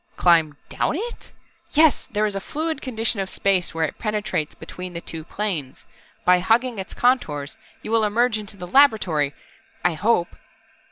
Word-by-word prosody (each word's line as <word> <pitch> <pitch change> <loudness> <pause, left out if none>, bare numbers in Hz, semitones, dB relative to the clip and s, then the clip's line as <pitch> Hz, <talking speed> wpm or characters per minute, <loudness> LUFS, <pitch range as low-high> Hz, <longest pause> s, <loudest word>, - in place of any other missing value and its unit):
"Climb 160 -4 +4
down - - -1
it 465 +7 -6 0.2
?" 335 - -38
"Yes, 310 -1 +4
there 215 0 +1
is 210 - -1
a 195 - -2
fluid 315 +5 -3
condition 225 -3 -1
of 190 -1 -2
space 190 -3 +1
where 165 0 0
it - - -7
penetrates 210 -8 -2
between 180 0 -8
the 170 - -4
two 160 -2 -7
planes. 165 -8 -4 0.4
By 180 0 +6
hugging 230 +4 +1
its 190 - -7
contours 150 - +1 0.3
you 215 - -5
will 225 -1 +3
emerge 220 +2 +2
into 205 -1 -6
the 180 - -6
laboratory 180 - +3 0.5
I 175 - +4
hope!" 175 +1 +1
205 Hz, 170 wpm, -23 LUFS, 175-235 Hz, 0.5 s, By